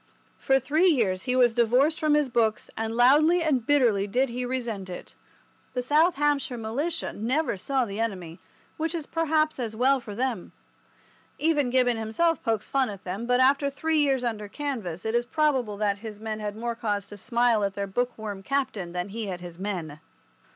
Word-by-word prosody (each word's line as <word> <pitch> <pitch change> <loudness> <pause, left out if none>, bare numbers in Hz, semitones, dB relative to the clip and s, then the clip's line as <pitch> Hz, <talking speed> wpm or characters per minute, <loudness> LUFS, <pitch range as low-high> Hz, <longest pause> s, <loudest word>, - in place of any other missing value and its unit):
For 270 0 +3
three 310 +8 +2
years 220 - +1
he 250 - +2
was 245 -2 +4
divorced 250 +7 +3
from 305 -1 +3
his 295 -2 +2
books, 230 -3 0
and 225 0 -3
loudly 305 +8 +5
and 275 -7 +1
bitterly 230 -7 +3
did 250 +6 +1
he 245 +1 -3
resent 235 -7 -4
it. 180 - -8 0.6
The 250 - -1
South 310 +7 +3
Hampshire 285 -3 0
Militia 280 +10 -3
never 255 +6 -1
saw 260 +6 0
the 200 -1 -6
enemy, 185 -7 -3 0.4
which 325 +1 -2
is 320 -3 -4
perhaps 315 -2 0
as 225 -3 -3
well 265 +4 +3
for 210 -4 -9
them. 240 -5 -3 0.8
Even 295 -5 +2
Gibbon 245 -2 +2
himself 270 +10 0
pokes 225 -2 -1
fun 265 -3 +1
at 200 -2 -8
them; 195 +6 -4
but 250 0 +3
after 275 +2 +4
three 315 +3 0
years 270 -3 +2
under 220 -3 -3
canvas 220 - -5
it 220 - -1
is 240 0 +2
probable 260 -10 +1
that 205 -1 0
his 215 -1 -8
men 220 0 -4
had 210 -1 -4
more 235 +2 -3
cause 205 -4 -2
to 205 - -9
smile 235 +1 +1
at 195 -1 -1
their 200 - -2
book 245 +5 -2
worm 205 -3 -6
captain 215 -8 -2
than 180 +2 -3
he 215 0 -4
at 180 -2 -4
his 175 -1 -10
men. 175 -7 -4
240 Hz, 195 wpm, -26 LUFS, 210-280 Hz, 0.8 s, loudly